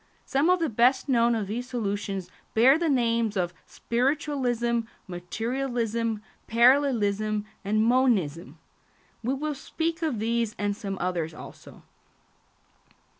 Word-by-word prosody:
Some 280 +5 +2
of 365 0 +4
the 330 - +1
best 245 +3 +3
known 235 -3 +3
of 215 -2 -1
these 240 +5 -4
solutions 200 -5 -3 0.2
bear 260 +7 +6
the 335 -2 +1
names 230 -5 +1
of 175 -1 -1
spiritualism, 245 -2 0 0.3
materialism, 230 +3 -2 0.2
parallelism, 220 -4 +3 0.2
and 215 +2 +1
monism. 225 - +1 0.7
We 255 +4 0
will 300 +2 -2
speak 325 +4 -3
of 310 -8 -1
these 230 0 -1
and 205 0 0
of 200 - -5
some 200 -4 -4
others 170 -3 -2
also. - - -12
235 Hz, 125 wpm, -26 LUFS, 205-265 Hz, 0.7 s, bear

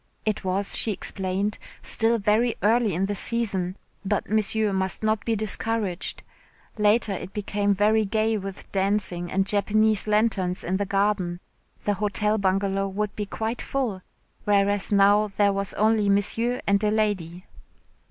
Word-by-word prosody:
It 215 -1 -1
was, 190 +2 -1
she 225 - +1
explained, 195 +1 -2 0.2
still 230 +1 +2
very 220 +3 +1
early 220 -3 +3
in 190 +3 +1
the 205 - -2
season 200 -4 0 0.3
but 200 +1 -2
Monsieur 215 -1 +2
must 190 +2 -2
not 215 -1 +1
be 230 - +1
discouraged. 215 -2 -1 0.6
Later 210 +1 +3
it 190 0 -5
became 205 -1 0
very 215 +2 +3
gay 220 +2 0
with 195 -2 -7
dancing 190 -3 -1
and 195 0 +1
Japanese 215 +1 +1
lanterns 210 -4 +1
in 185 +2 -1
the 200 0 -2
garden. 195 -3 0 0.4
The 205 - +1
Hotel 210 +1 0
Bungalow 195 0 0
would 205 +1 -3
be 210 -1 -4
quite 225 +3 -3
full, 240 -9 -2 0.4
whereas 205 0 +2
now 205 +1 +4
there 200 -1 +3
was 195 0 -3
only 215 -1 +2
Monsieur 225 +5 +1
and 200 +1 +2
a 210 - +3
lady. 195 -5 -1
205 Hz, 150 wpm, -25 LUFS, 195-215 Hz, 0.6 s, now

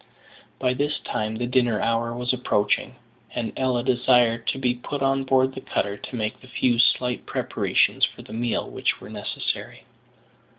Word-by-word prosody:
By 125 -1 +1
this 145 +4 0
time 110 +1 -2
the 120 +2 -2
dinner 120 -3 +2
hour 115 0 0
was 125 +1 -1
approaching, 105 -5 +1 0.4
and 120 -2 -2
Ella 130 -2 +1
desired 120 -2 +3
to - - +1
be 125 -2 +1
put 135 +3 -4
on 135 0 +2
board 130 0 +3
the 130 - -7
cutter 100 -6 -1
to 115 - -8
make 110 +2 -3
the 130 - -14
few 125 -2 +1
slight 125 0 +2
preparations - - +1
for - - +1
the - - -11
meal 120 +1 -1
which - - -1
were - - -11
necessary. - - -4
125 Hz, 170 wpm, -25 LUFS, 115-130 Hz, 0.4 s, desired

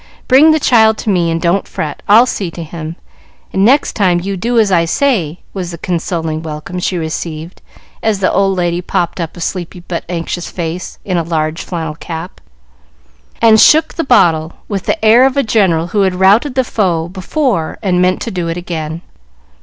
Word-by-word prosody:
Bring 275 +5 +6
the 315 0 +4
child 220 -5 +4
to 215 - -2
me, 175 -3 +1
and 165 0 -1
don't 175 +4 0
fret. 150 -2 -5
I'll 225 +4 +7
see 200 -7 -3
to 170 0 -7
him, 160 0 -7 0.6
and 190 - +2
next 265 +7 +3
time 185 -4 +2
you 195 +3 -3
do 235 +6 -1
as 215 -3 +3
I 170 -2 +4
say," 175 - 0
was 185 -3 -4
the 170 - -7
consoling 165 -2 -3
welcome 160 +3 -6
she 180 0 -1
received 160 0 -5 0.4
as 220 -3 0
the 185 - +1
old 195 -1 +1
lady 175 0 0
popped 175 0 -2
up 165 +1 -6
a - - -8
sleepy 180 +1 -4
but 170 -1 -5
anxious 175 0 -4
face 175 +1 -5
in 185 -3 -1
a - - +2
large 160 -1 -2
flannel 160 -3 -4
cap, 165 +2 -8 1.0
and 220 -1 +6
shook 315 +1 +5
the 330 - -2
bottle 170 - +3
with 200 -3 -4
the - - -1
air 230 +4 +6
of 270 +1 +2
a 280 - +3
general 190 -7 +2
who 205 - +1
had 190 -2 +1
routed 205 +9 +3
the 260 - +2
foe 180 -9 -1
before 195 - -2
and 180 -3 +1
meant 185 0 +1
to 230 - -4
do 180 -3 -3
it 165 +1 -3
again. 165 -2 -5
180 Hz, 195 wpm, -14 LUFS, 165-210 Hz, 1.0 s, I'll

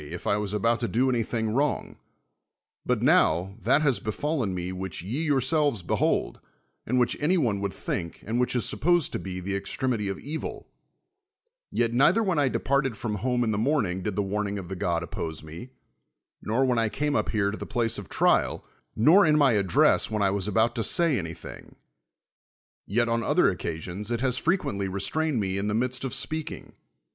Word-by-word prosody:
if 85 +2 -7
I 100 - +2
was 105 -1 -2
about 115 +3 +1
to 120 - -1
do 130 +4 +1
anything 115 -2 -1
wrong; 140 +5 -1 0.9
but - - 0
now, 90 +5 +3
that 155 - +3
has 135 -5 +2
befallen 125 +1 -2
me 90 0 -3
which 95 -3 -5
ye 140 - -2
youi'selves 140 - +1
behokl, - - 0 0.5
and 125 +2 +2
which 120 - +2
any 170 +6 +2
one 110 - 0
would 100 -1 -2
think 85 -2 -5
and 115 +3 -1
which 125 0 +1
is 120 -5 0
sup - - -2
]X)sed 175 -1 +3
to - - -3
be 90 -1 -5
the 100 +2 -3
extremity 105 +2 -1
of 95 - -3
evil, 155 +8 -6 1.0
yet 115 -1 0
neither 170 - +4
\\hen 185 -7 +1
I 140 - +3
departed 135 -3 0
from 105 -1 -3
home 125 +3 0
in 110 - 0
the 105 - -1
morning 110 -8 0
did 105 +1 -3
the 105 - 0
warning 100 +1 -2
of 90 -3 -7
the 95 - -4
god 85 -2 -1
oppose 80 -2 -5
me, 80 +10 -9 0.7
nor 120 +5 +1
when 125 -2 +1
I 115 -1 +1
came 145 +5 -1
up - - 0
hei'c 100 -2 +1
to 110 - -5
the - - -7
place 115 -3 -1
of 100 - -10
trial, - - +1 0.3
nor 165 - +6
in 150 -1 +4
my 140 -3 +5
address 100 -5 +3
when 105 -2 -1
I 100 - +3
was 100 0 -2
about 110 +3 +2
to 115 - 0
say 160 +3 +2
anything; 80 -2 -9 1.1
yet 120 +4 +1
on 115 0 0
other - - +3
occasions 90 +6 -5
it 120 -1 -1
has 130 -1 +1
frecpiently 100 - 0
restrained 125 +9 0
me 95 -1 -1
in 100 - -2
the 105 - 0
midst 125 +2 -1
of 135 - -2
speaking. 155 -1 -2
115 Hz, 195 wpm, -26 LUFS, 100-135 Hz, 1.1 s, nor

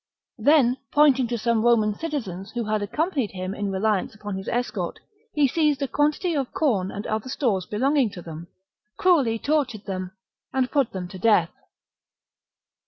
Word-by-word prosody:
Then, 260 0 +4
pointing 280 -4 +4
to 240 0 -2
some 230 0 +1
Roman 225 -3 +3
citizens 205 - -5
who 240 -1 -2
had 215 -1 -1
accompanied 265 - -1
him 185 0 -4
in 205 -1 -3
reliance 205 +1 0
upon 210 -2 -6
his 190 0 -6
escort, 245 +1 -2 0.3
he 295 -3 +3
seized 300 0 +1
a - - 0
quantity 300 +6 +1
of 275 -3 -1
corn 210 -12 +1
and 205 +2 -6
other 220 +4 -2
stores 220 -9 0
belonging 265 +3 +2
to 180 - -8
them, 165 +1 -8 0.5
cruelly 285 -12 +3
tortured 265 -6 -1
them, 185 -2 -4 0.4
and 260 -1 0
put 275 -5 +2
them 185 -2 -5
to 185 - -9
death. 185 -6 +3
230 Hz, 165 wpm, -24 LUFS, 200-280 Hz, 0.5 s, Then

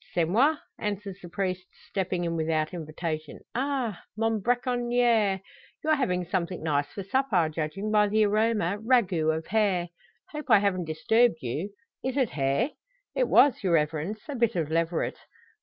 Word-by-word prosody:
"C'est 170 -2 +3
moi!" 260 - +3 0.2
answers 200 -2 -4
the 175 - -9
priest, 185 0 -3 0.2
stepping 185 -2 -1
in 170 -1 -1
without 160 0 0
invitation. 155 -1 -5
"Ah! 255 -6 -1 0.2
mon 225 -1 +1
bracconier! 240 -4 +2 0.4
you're 310 0 +3
having 180 -10 0
something 180 -1 -2
nice 145 -2 +1
for 200 - -6
supper. 200 -6 +2
Judging 160 +7 -3
by 210 -1 +4
the 215 +1 +3
aroma 210 -2 +1
ragout 185 -10 +2
of 160 - -6
hare. 195 -4 +1 0.4
Hope 300 -1 -7
I - - +8
haven't 195 -3 0
disturbed 165 - +2
you. 150 - -3 0.3
Is 260 +1 -2
it 260 -6 +2
hare?" 140 - 0 0.4
"It - - +1
was, 275 -6 +5
your 185 -3 +2
Reverence, 160 +6 0
a 290 - -4
bit 235 -3 +1
of 160 -3 -1
leveret." 165 +1 0
195 Hz, 155 wpm, -27 LUFS, 165-230 Hz, 0.4 s, I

